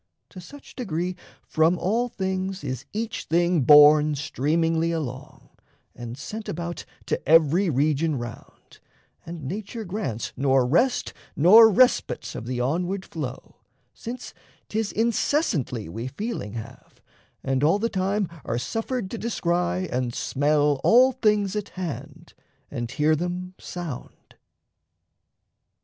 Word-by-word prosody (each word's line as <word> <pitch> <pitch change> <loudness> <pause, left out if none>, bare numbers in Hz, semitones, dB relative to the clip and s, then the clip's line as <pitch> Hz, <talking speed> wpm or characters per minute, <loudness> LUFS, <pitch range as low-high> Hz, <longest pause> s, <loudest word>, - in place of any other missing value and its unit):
To 185 - -11
such 285 +11 -14
degree 180 -6 -3 0.3
from 160 +3 +2
all 230 +8 0
things 190 -1 -3
is 130 +1 -5
each 225 +1 -4
thing 170 0 +2
Borne 150 +2 +7
streamingly 160 +4 0
along, 135 -6 -6 0.5
and 120 +1 -7
sent 215 +10 -7
about 170 +1 -5 0.2
To - - -2
every 165 +4 +5
region 150 +2 +1
round; 120 -1 -10 0.5
and 165 -2 -7
nature 210 - -5
grants 175 - -4
Nor 135 -1 +2
rest 240 - +1 0.2
nor 215 +9 +8
respite 245 +5 +2
of 115 - -7
the 125 -1 -3
onward 180 +9 -1
flow, 145 -7 -7 0.4
Since 245 +2 -8 0.4
'tis 220 -1 -1
incessantly 220 - 0
we 115 +9 -5
feeling 140 - -5
have, 115 -2 -10 0.4
And 135 +1 0
all 160 +6 +4
the 225 +3 0
time 195 0 -1 0.2
are 115 - -2
suffered 225 - -3
to 230 - -5
descry 180 -4 -1
And 125 -1 -2
smell 145 0 +1
all 255 +3 +6
things 210 -5 +1
at 210 -1 -3
hand, 175 -5 -7 0.4
and 120 -1 -4
hear 155 +4 +2
them 180 +3 -4
sound. 170 -8 -8
170 Hz, 125 wpm, -24 LUFS, 140-205 Hz, 0.5 s, nor